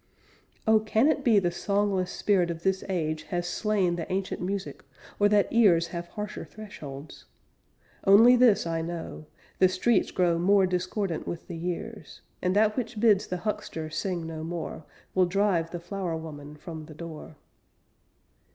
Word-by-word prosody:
Oh! 220 0 +5
Can 220 +4 +2
it 310 -2 0
be 230 -5 +5
the 175 -3 +2
songless 200 0 0
spirit 185 -4 +1
of 165 0 -5
this 190 0 +1
age 155 -4 -1
Has 175 -1 -2
slain 190 -3 0
the 165 - -5
ancient 190 0 -2
music, 195 +2 -4 0.4
or 205 0 +5
that 205 -1 +4
ears 180 -8 +4
Have 170 -1 -5
harsher 210 +1 -6
thresholds? 150 -9 -10 0.8
Only 225 +6 +8
this 240 -7 +4
I 165 -1 -1
know: 165 -2 -6 0.3
The 185 - +6
streets 195 +4 +2
grow 175 -2 +1
more 195 +2 +4
discordant 185 0 -2
with 170 - -5
the 175 - -6
years; 180 +6 -6 0.2
And 180 +1 0
that 210 0 +3
which 240 -3 -3
bids 210 -3 +4
the 180 - -3
huckster 210 -7 -3
sing 175 +1 -2
no 160 -1 -6
more, 165 -2 -5 0.3
Will 185 -1 +3
drive 185 -3 +1
the 175 - -5
flower 175 -1 -4
woman 150 -2 -9
from 160 0 -8
the 155 - -11
door. 160 -1 -9
185 Hz, 160 wpm, -27 LUFS, 165-205 Hz, 0.8 s, Only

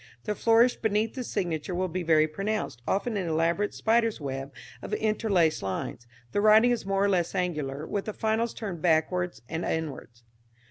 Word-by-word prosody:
The 210 - -1
flourish 230 +3 +4
beneath 220 0 0
the 255 - -4
signature 175 -5 -2
will 185 +1 0
be 180 +1 -3
very 160 -2 +4
pronounced, 195 - -3
often 205 +3 0
an 185 -3 -2
elaborate 165 +6 +1
spider's 230 0 +2
web 135 -1 -5 0.3
of - - -3
interlaced 205 -7 +1
lines. 100 +5 -4 0.2
The 205 - +1
writing 215 +3 +6
is 235 -5 -2
more 195 0 +1
or 200 - +3
less 175 -3 0
angular 150 -5 -2
with 200 +4 -3
the 215 - -4
finals 220 +2 -1
turned 195 -7 -5
backwards 175 0 +1
and 165 +5 -3
inwards. 135 -7 -4
185 Hz, 175 wpm, -27 LUFS, 160-215 Hz, 0.3 s, writing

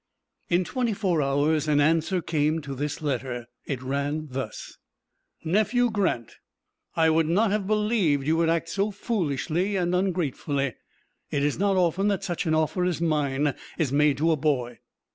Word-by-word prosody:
In 175 +1 +3
twenty 240 +3 -1
four 190 -6 0
hours 145 +3 +1
an 150 -1 +3
answer 165 +4 +2
came 155 0 +1
to 140 -2 -6
this 145 +3 -4
letter. 125 -4 -2 0.2
It 130 -3 -3
ran 140 +3 -2
thus: 130 -4 -6 0.6
"NEPHEW 220 +7 +2
GRANT: 185 - -1 0.6
I 160 -1 +4
would 160 0 +2
not 200 +5 +3
have 205 -2 -1
believed 210 -10 +1
you 160 +2 +2
would 165 0 +2
act 165 0 0
so 200 +3 0
foolishly 185 - -1
and 180 -2 0
ungratefully. 155 -7 -1 0.6
It 140 - 0
is 145 +2 0
not 200 -1 +2
often 180 +2 +2
that 200 -2 0
such 175 -1 -2
an 160 - +2
offer 160 +3 +1
as 180 -3 0
mine 145 -3 +1 0.2
is 155 -7 0
made 145 -1 +3
to 165 +3 +2
a - - +3
boy. 135 -5 -1
160 Hz, 165 wpm, -26 LUFS, 145-185 Hz, 0.6 s, I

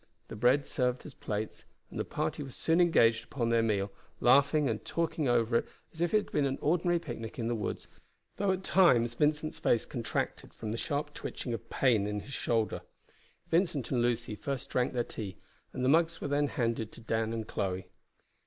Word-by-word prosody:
The - - -6
bread 125 +6 +3
served 125 -1 -1
as 150 - -9
plates, 105 -1 -4 0.3
and - - -6
the - - +1
party - - -2
were 140 - -6
soon 165 +6 +2
engaged 115 -10 +4
upon 120 -4 -2
their 115 0 +4
meal, 100 -3 0 0.3
laughing 140 +3 +5
and - - -2
talking 165 -3 -1
over 115 -1 +3
it - - -2 0.3
as 165 - -8
if 175 - +2
it 215 - +5
had 210 - -3
been 140 -2 +2
an 135 - -2
ordinary 175 +2 +2
picnic 120 -8 -6
in 115 -2 -2
the 120 - 0
woods, 110 -3 -3 0.5
though 200 -1 +2
at 190 0 -2
times 125 -14 +4
Vincent's 150 +4 0
face 120 -8 +2
contracted 120 -3 -3
from 110 -2 -5
the - - -1
sharp 145 -1 -2
twitching 120 - -5
of 115 - -6
pain 115 -7 +2
in 105 0 -2
his 140 - -10
shoulder. 115 -4 0 0.7
Vincent 165 - +1
and 125 -3 +2
Lucy 120 -2 0
first 130 +5 -4
drank 125 0 +1
their 120 -1 +1
tea, 100 -6 -7 0.3
and 130 -1 -2
the - - +4
mugs 165 +2 +3
were - - -3
then 145 +1 +2
handed 115 -4 -1
to - - -10
Dan 110 0 -1
and 110 -1 -3
Chloe. 95 -1 -2
125 Hz, 200 wpm, -31 LUFS, 115-150 Hz, 0.7 s, laughing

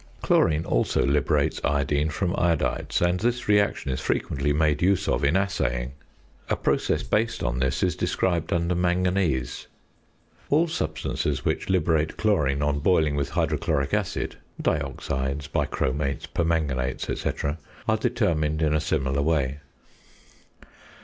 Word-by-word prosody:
Chlorine 80 0 +3
also - - +1
liberates 70 +1 +1
iodine 70 +1 +1
from 85 +4 -1
iodides; 85 0 0
and 90 +1 +2
this 120 +3 -1
reaction 100 -9 +2
is 65 - -3
frequently 70 +1 -1
made 75 0 +2
use 95 +1 +2
of - - 0
in 70 +4 +3
assaying. 60 -10 0 0.6
A - - +2
process - - 0
based 115 +2 0
on 60 0 -1
this 65 0 0
is - - +1
described 85 -4 -1
under 85 +1 +1
Manganese. 90 -7 0 0.8
All 160 +4 +3
substances 75 - -2
which - - -1
liberate 80 -4 +1
chlorine 75 -10 +1
on 75 0 +1
boiling 80 -2 +2
with 70 -1 -1
hydrochloric 70 0 0
acid - - -1 0.2
(dioxides, 70 -1 -2
bichromates, 70 0 -1
permanganates, 75 -7 -1
&c.) 70 - -2 0.3
are - - +3
determined 75 -1 0
in 75 -1 +2
a 75 - +2
similar 70 -3 0
way. 70 -3 0
75 Hz, 130 wpm, -25 LUFS, 70-85 Hz, 0.8 s, Chlorine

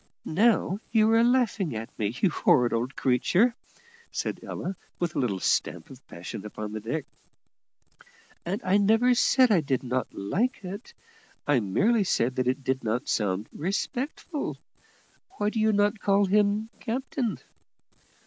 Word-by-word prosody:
"Now 200 +1 +2
you 220 -1 +4
are 225 +1 +5
laughing 235 - +1
at 110 +1 -5
me, 105 -1 0
you 190 - +3
horrid 125 -5 +3
old 120 +3 -2
creature," 175 - +2 0.6
said - - -3
Ella, 185 +3 -5 0.2
with 175 -2 -2
a - - 0
little 105 -7 0
stamp - - 0
of - - -14
passion 85 +3 -8
upon 105 0 -6
the 110 - -4
deck; 135 +8 -3 1.4
"and 190 +5 -2
I 185 +2 +3
never 225 +5 +4
said 250 0 +4
I 185 -6 +4
did 135 -3 -1
not 125 -1 -1
like 210 - -1
it; 200 - -8 0.5
I 145 -3 +3
merely 200 - +2
said 125 -8 0
that 130 -1 0
it 130 +2 0
did 130 0 -1
not 115 +5 -2
sound 100 -1 0
respectful. 260 - -3 0.8
Why 210 0 0
do 225 - -2
you 220 0 +3
not 205 +1 +2
call 200 0 +3
him 210 +3 +2
captain?" 245 0 -2
190 Hz, 150 wpm, -27 LUFS, -, 1.4 s, are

